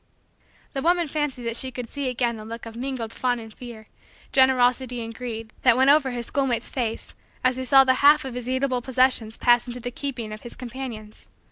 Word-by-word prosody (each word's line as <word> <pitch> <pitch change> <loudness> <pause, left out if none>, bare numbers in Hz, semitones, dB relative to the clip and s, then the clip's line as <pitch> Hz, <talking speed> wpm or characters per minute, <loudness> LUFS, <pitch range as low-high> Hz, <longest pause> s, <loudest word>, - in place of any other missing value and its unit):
The 270 - -2
woman 345 +2 +2
fancied 295 -4 -3
that 230 -1 -2
she 260 +2 -1
could 250 -2 -6
see 280 +2 -3
again 245 -1 -1
the 215 - -9
look 230 +2 -8
of 230 0 -9
mingled 245 -2 -4
fun 250 -1 0
and 225 -2 -10
fear, 230 -3 -11 0.4
generosity 255 -1 +3
and 230 - -7
greed, 225 -2 -6
that 245 -2 +5
went 265 +2 +6
over 290 -2 +4
her 245 -1 -4
schoolmate's 260 -1 -1
face 230 -4 -4 0.3
as 255 0 +3
he 260 - -4
saw 270 +1 +7
the 260 -1 +4
half 290 0 +6
of 260 - -5
his 250 0 -5
eatable 260 -1 0
possessions 255 -3 +1
pass 240 0 +3
into 245 0 -5
the 245 +1 -5
keeping 245 -5 -5
of 215 - -9
his 240 - -10
companions. 240 -4 -8
250 Hz, 210 wpm, -24 LUFS, 235-265 Hz, 0.4 s, saw